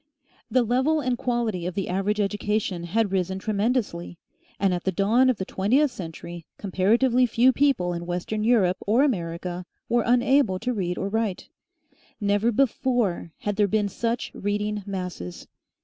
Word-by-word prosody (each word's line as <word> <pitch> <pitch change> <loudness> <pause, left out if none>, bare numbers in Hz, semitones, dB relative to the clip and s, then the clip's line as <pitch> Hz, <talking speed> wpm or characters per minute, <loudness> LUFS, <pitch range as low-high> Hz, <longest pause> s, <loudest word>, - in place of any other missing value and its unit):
The 255 -1 +3
level 260 +7 +2
and 255 -3 0
quality 235 -8 -1
of 180 - -5
the 195 - -2
average 195 +3 -1
education 205 -3 -1
had 205 +3 0
risen 190 0 0
tremendously; 200 -4 -1 0.4
and 195 -2 +2
at 175 - -3
the 190 - 0
dawn 220 +8 +3
of 255 - +1
the 190 - -3
twentieth 250 +12 +2
century 170 -2 -8
comparatively 230 +6 +2
few 240 +3 +4
people 255 -12 +2
in 170 0 -5
Western 180 +5 -2
Europe 205 -6 +3
or 230 +6 +4
America 175 - -2 0.2
were 240 0 +2
unable 245 -4 +3
to 250 +6 -2
read 180 -5 -2
or 195 - -2
write. 215 -2 -2 0.7
Never 205 +2 +2
before 235 -7 0
had 205 -1 -2
there 205 -1 +4
been 205 +1 +1
such 230 +4 -2
reading 210 +1 -2
masses. 180 - -6
205 Hz, 155 wpm, -25 LUFS, 185-240 Hz, 0.7 s, few